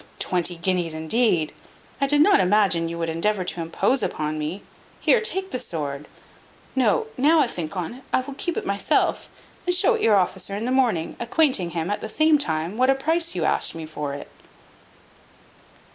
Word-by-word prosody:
Twenty 180 -1 -1
guineas, 170 -2 -1
indeed! 160 0 +1 0.5
I 275 - +3
did 290 +1 +4
not 400 +6 +5
imagine 185 -3 +2
you 170 - -5
would 165 0 -2
endeavour 185 +5 0
to 175 -1 -4
impose 165 +11 0
upon 155 0 -2
me. 160 +6 -4 0.4
Here, 470 - +3
take 385 -4 -2
the 255 - -2
sword 145 -6 -4 0.7
No, 260 - +2
now 305 +5 +5
I 295 - +5
think 175 -6 -5
on't, 235 +10 -5
I - - +2
will 275 +2 -8
keep 335 +4 -3
it - - -3
myself, 200 0 0 0.4
and 360 - +5
show 370 - +4
it 455 - -2
your 215 - +4
officer 190 +1 0
in 210 +3 -3
the 250 - -1
morning, 235 -11 +1
acquainting 235 - +1
him, 165 +4 -1
at 205 - -2
the 220 - -5
same 310 +2 +3
time, 165 - -2
what 255 +1 +3
a 270 - +5
price 325 - -1
you 170 -3 -1
asked - - +1
me 165 -1 -6
for 150 -2 -5
it." 145 - -8
200 Hz, 190 wpm, -23 LUFS, 165-270 Hz, 0.7 s, not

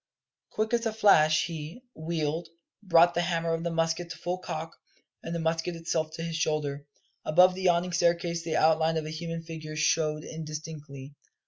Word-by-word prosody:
Quick 220 +2 -2
as 235 -1 +2
a 220 - -2
flash 155 -8 +5
he, 165 +7 -7
wheeled, 160 0 -3 0.3
brought 175 -3 +5
the 175 - +1
hammer 165 -1 0
of 165 0 -2
the 170 - -1
musket 165 +1 -1
to - - -7
full 180 +1 -3
cock, 165 -2 -6 0.5
and 170 - -5
the - - -2
musket 165 +1 -1
itself 165 -1 -1
to 165 - -5
his 165 -1 -3
shoulder. 150 -3 -1 0.4
Above 180 +4 +5
the 190 - -6
yawning 180 -1 +2
staircase 170 0 +1
the 160 -1 -2
outline 160 +1 +3
of 155 - -2
a 155 - -5
human 165 +1 -5
figure 160 -2 -7
showed 155 0 +1
indistinctly. 155 -3 -8
165 Hz, 180 wpm, -28 LUFS, 155-170 Hz, 0.5 s, flash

